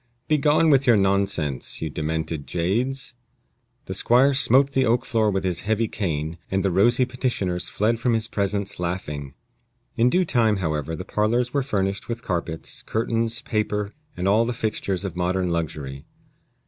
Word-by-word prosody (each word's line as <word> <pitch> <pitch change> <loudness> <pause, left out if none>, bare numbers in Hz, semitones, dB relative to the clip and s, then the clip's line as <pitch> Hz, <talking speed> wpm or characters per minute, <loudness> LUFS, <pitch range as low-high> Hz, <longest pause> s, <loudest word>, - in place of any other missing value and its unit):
Begone 155 +1 +3
with 140 -1 +3
your 120 -3 +6
nonsense, 95 -8 0
ye 80 - -2
demented 80 0 -3
jades!" 120 - -1 0.7
The 95 - -5
squire 125 +8 +4
smote 135 0 +4
the 135 -1 +2
oak 120 0 +2
floor 110 -2 +2
with 95 -1 -1
his 90 -2 0
heavy 110 +2 0
cane, 80 -5 -3
and 95 0 0
the 95 - +1
rosy 120 +8 +4
petitioners 120 -8 -2
fled 110 +2 0
from 120 0 +1
his 110 0 +1
presence 100 -3 -2
laughing. 75 -6 -4 0.6
In 120 +2 +4
due 180 +6 +2
time, 115 -8 +2
however, 80 -4 -2
the 90 - -7
parlors 120 +4 0
were 140 - +2
furnished 100 -7 -2
with 115 0 -4
carpets, 85 -4 -4
curtains, 115 +1 -1
paper, 105 -1 -1 0.2
and 90 - -1
all 105 +3 +4
the 120 +1 -2
fixtures 105 -4 -2
of 95 - -5
modern 90 0 0
luxury. 75 -5 -4
100 Hz, 160 wpm, -24 LUFS, 90-120 Hz, 0.7 s, your